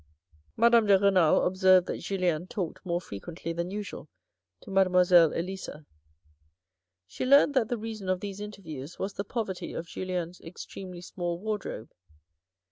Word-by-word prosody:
Madame 235 -1 +5
de 200 -1 +7
Renal 190 -5 +4
observed 185 -1 +5
that - - -4
Julien 180 -3 -1
talked 185 -5 -5
more 175 -2 -1
frequently 165 - -7
than 170 +1 -3
usual 205 +1 -6 0.5
to 205 - -11
Mademoiselle 180 -3 +5
Elisa. 175 -3 -5 1.2
She 95 - -6
learnt 280 +2 +6
that 250 -5 +2
the 245 - -1
reason 215 -3 -6
of 185 -1 +1
these 200 0 -6
interviews 175 -8 -8
was 195 +1 -3
the 200 - -3
poverty 205 -3 -4
of 165 - -4
Julien's 180 0 -4
ex 165 +2 -9
tremely 180 -2 -9
small 175 -1 -4
wardrobe. 205 - -5
185 Hz, 145 wpm, -28 LUFS, 175-205 Hz, 1.2 s, de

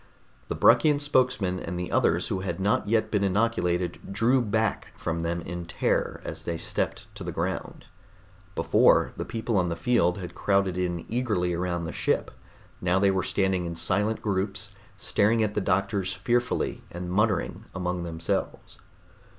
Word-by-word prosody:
The - - -3
Bruckian 150 -2 +5
spokesman 125 -10 +1
and 90 +1 -4
the 90 - -4
others - - +2
who 95 - -1
had 95 -2 -3
not 100 +1 +1
yet 110 -1 +2
been 105 -2 +1
inoculated 90 -4 +1
drew 115 +6 +3
back 110 -2 0
from 80 0 -2
them 85 +1 -2
in 85 0 -6
terror - - 0
as - - -5
they 85 -1 -3
stepped - - -3
to - - -8
the - - -4
ground. - - -4 0.7
Before, - - +4
the - - -4
people 115 -1 -2
on 90 -2 +2
the 85 - -2
field 90 -3 +2
had 90 -3 -7
crowded 100 -2 +1
in 90 -2 -2
eagerly 105 -8 0
around 85 0 -1
the 80 - -4
ship; - - 0 0.5
now 90 +1 +2
they 100 0 +4
were 95 -1 +1
standing 95 -1 0
in 85 - -5
silent 105 +6 0
groups 100 0 -2 0.3
staring 110 +3 +2
at 105 -1 -1
the 105 - 0
doctors 95 0 0
fearfully 120 +1 0
and 90 0 -6
muttering 105 0 0
among 90 -1 -2
themselves. 85 -1 -3
95 Hz, 165 wpm, -27 LUFS, 90-110 Hz, 0.7 s, Bruckian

